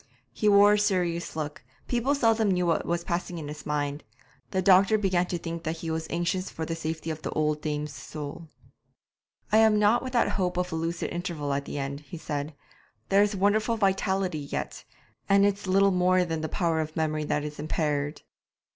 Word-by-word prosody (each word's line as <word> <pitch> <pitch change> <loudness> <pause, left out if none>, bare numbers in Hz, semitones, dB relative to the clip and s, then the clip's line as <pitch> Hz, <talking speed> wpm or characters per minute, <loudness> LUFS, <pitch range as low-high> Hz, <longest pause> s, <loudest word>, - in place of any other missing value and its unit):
He 210 - +2
wore 205 0 +7
a 210 - +3
serious 180 -6 0
look 150 -3 -5 0.2
people 250 +4 +1
seldom 225 -5 +3
knew 180 -1 +1
what 165 -1 +1
was 170 0 -1
passing 175 0 -3
in 155 -3 -6
his 150 +1 -8
mind; 145 -1 -2 0.5
the 190 - -1
doctor 195 +3 +5
began 185 -3 +1
to 175 - -2
think 165 0 -5
that 165 0 -3
he 165 0 -4
was 160 0 -3
anxious 175 +2 -1
for 160 - -5
the 165 - -3
safety 160 0 -4
of 155 0 -6
the - - -4
old 150 -1 0
dame's 150 -1 -3
soul. 150 +4 -7 1.0
'I 215 - +5
am 220 -1 +5
not 210 +3 +4
without 255 -2 +1
hope 180 -3 -1
of 180 0 -1
a - - -2
lucid 165 +1 -2
interval 170 -5 -3
at 140 0 -2
the - - -5
end,' 140 0 -3
he 150 +3 -10
said; 150 -1 -4 0.5
'there 195 +1 +5
is 205 0 +2
wonderful 215 +4 +2
vitality 190 -4 +1
yet, 140 -1 -5 0.4
and 200 0 +5
it's 200 -1 -1
little 195 +1 +4
more 180 0 +3
than 165 -2 -3
the 160 - -3
power 170 -4 0
of 155 0 -5
memory 155 -1 0
that 145 0 0
is 150 0 -6
impaired.' 150 -1 -2
170 Hz, 200 wpm, -27 LUFS, 155-195 Hz, 1.0 s, wore